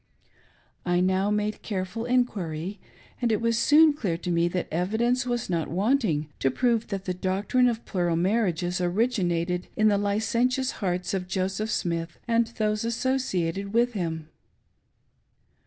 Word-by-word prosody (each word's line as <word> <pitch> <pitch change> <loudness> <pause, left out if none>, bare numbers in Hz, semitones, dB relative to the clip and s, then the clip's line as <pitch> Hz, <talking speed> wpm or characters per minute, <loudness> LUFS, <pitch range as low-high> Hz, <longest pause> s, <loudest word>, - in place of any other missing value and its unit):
I 175 -1 +1
now 190 +2 +2
made 210 0 -1
careful 210 +3 -4
en 250 0 +4
quiry, 180 -2 -5 0.4
and 240 -2 +2
it 215 - +2
was 230 0 +1
soon 300 +6 +6
clear 195 - -2
to 175 +1 -4
me 170 0 +2
that 180 +1 -2
evidence 235 +9 0
was 240 -1 -1
not 170 -3 -1
wanting 195 - +1
to 135 - +2
prove 235 - +1
that 195 -2 -4
the 185 - -1
doctrine 195 +7 +1
of 230 -1 -4
plural 175 -4 0
marriages 180 -1 0
origin 195 +2 +1
ated 175 +1 -1
in 215 0 +4
the 200 -1 +2
licentious 235 +6 +1
hearts 180 -1 -1
of 185 -2 -2
Joseph 190 +3 -2
Smith 170 -4 -2
and 230 0 +2
those 215 0 0
asso 245 +3 0
ciated 195 -4 -2
with 240 +1 +2
him. 165 -5 -3
200 Hz, 155 wpm, -26 LUFS, 180-230 Hz, 0.4 s, soon